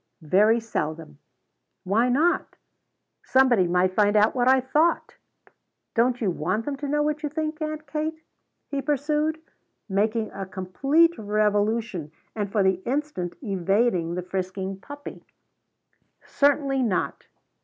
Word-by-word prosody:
"Very 210 +9 +4
seldom." 155 -8 -4 0.6
"Why 220 +6 +2
not?" 310 +8 +1 0.7
"Somebody 250 -8 +4
might 180 +1 +2
find 205 +1 +3
out 210 +1 +4
what 250 -1 +1
I 265 0 +6
thought." 300 +6 +1 0.8
"Don't 240 +1 +2
you 205 -5 0
want 185 +7 -2
them 290 - -2
to 285 +1 -5
know 295 +1 +1
what 300 0 -1
you 300 - -2
think, 310 +1 -3
Aunt 305 0 -4
Kate?" 310 +2 -4 0.5
he 280 -1 -1
pursued, 300 +3 0 0.5
making 215 +2 0
a 195 -1 -6
complete 275 - +2
revolution 210 -4 0 0.2
and 205 -2 -3
for 205 -2 +2
the 190 -1 +1
instant 270 - -3
evading 195 -3 +1
the 180 - -3
frisking 190 +1 -4
puppy. 285 +6 -10 1.0
"Certainly 280 -1 +2
not." 215 -7 -1
230 Hz, 130 wpm, -25 LUFS, 190-290 Hz, 1.0 s, I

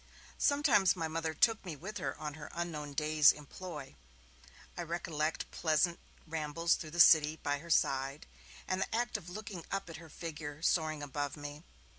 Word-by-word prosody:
Sometimes 275 - +4
my 165 -3 -2
Mother 160 0 -2
took 225 +6 +3
me 175 -5 -5
with 195 +10 -6
her - - -3
on 150 -1 -4
her 150 0 -9
'unknown 155 -4 -4
day's 150 0 +5
employ'; 150 -1 -8 0.8
I - - -4
recollect 160 -2 -2
pleasant 170 +1 +1 0.3
rambles 165 +1 0
through 155 - -3
the 170 +3 -6
City 155 -2 +7
by 145 -2 -2
her 170 +3 -12
side, 135 -1 +1 0.4
and 185 0 0
the 220 - -1
act 240 +1 0
of 185 -5 -4
looking 200 -2 -7
up 195 -3 -3
at - - -7
her 165 -1 -12
figure 150 -1 -7
soaring 155 -4 +1
above 145 +1 -3
me. 145 +1 -7
160 Hz, 170 wpm, -33 LUFS, 150-175 Hz, 0.8 s, City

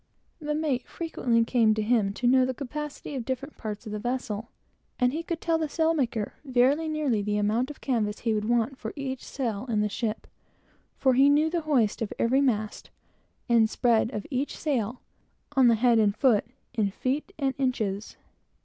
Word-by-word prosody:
The 300 -1 -2
mate 290 -5 -1
frequently 240 -8 0
came 225 -3 +3
to 215 - -1
him 215 -3 +2
to 250 - -3
know 255 +1 +5
the 255 0 -1
capacity 295 +2 -6
of 260 -3 -3
different 260 +4 -4
parts 215 0 -6
of 215 - -6
the 210 - -3
vessel, 235 -2 -3 0.5
so 250 - +4
he 300 +6 -1
could 335 0 -4
tell 330 -1 +1
the 315 -2 -1
sailmaker 285 -10 0
very 270 +4 +2
nearly 295 -8 0
the 210 +1 -1
amount 220 +5 +1
of 295 - -10
canvas 220 -5 -1
he 230 -2 +1
would 210 -1 -1
want 240 +3 0
for - - -5
each 265 -3 -4
sail 235 -4 -3
in 215 -2 +1
the 210 - 0
ship; 220 +1 -3 0.7
for 260 -1 +3
he 270 +3 +6
knew 305 +2 +3
the 340 -1 0
hoist 235 -8 +2
of 220 - -2
every 260 +4 +3
mast, 215 -6 -1 0.6
and 230 -3 +4
spread 230 -2 +2
of 210 -4 -5
every 270 +2 0
sail, 250 -6 -2 0.5
on 265 -2 +6
the 230 - +5
head 235 0 +4
and 210 -1 +2
foot, 235 -6 +3 0.3
in 215 -4 +1
feet 265 - -2
and 275 -3 0
inches. 220 -6 -2
245 Hz, 190 wpm, -27 LUFS, 220-275 Hz, 0.7 s, he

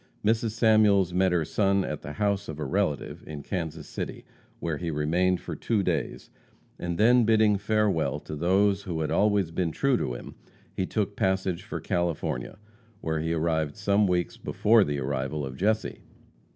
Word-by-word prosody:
Mrs. 110 0 +1
Samuels 105 -5 +4
met 95 +1 +3
her 85 -3 +1
son 95 +4 +1
at - - -4
the 75 - -7
house 100 +4 0
of 80 - -6
a 75 - -3
relative 95 -7 -1
in 75 -2 -7
Kansas 80 -5 -4
City, - - -6 0.3
where 80 -3 -2
he 85 +1 -3
remained 85 +4 +1
for - - -6
two 110 -4 0
days, - - -2 0.5
and 85 -1 -3
then 120 +3 +5
bidding 110 -1 +4
farewell 100 -9 +1
to 75 - -7
those 95 +5 +2
who 85 -5 -4
had 75 - -2
always 100 -4 +2
been 85 -1 -1
true 135 - +1
to 65 - -2
him, - - -9 0.4
he 95 - -2
took 105 -2 -2
passage 95 -2 0
for 110 - -6
California, 85 - -2 0.4
where 80 -1 -1
he 80 +1 -2
arrived 80 -2 0
some 105 0 +2
weeks 90 -1 -1
before 110 0 +3
the 75 -5 -2
arrival 70 +2 -2
of 65 -1 -7
Jesse. 110 +7 0
90 Hz, 175 wpm, -27 LUFS, 80-105 Hz, 0.5 s, then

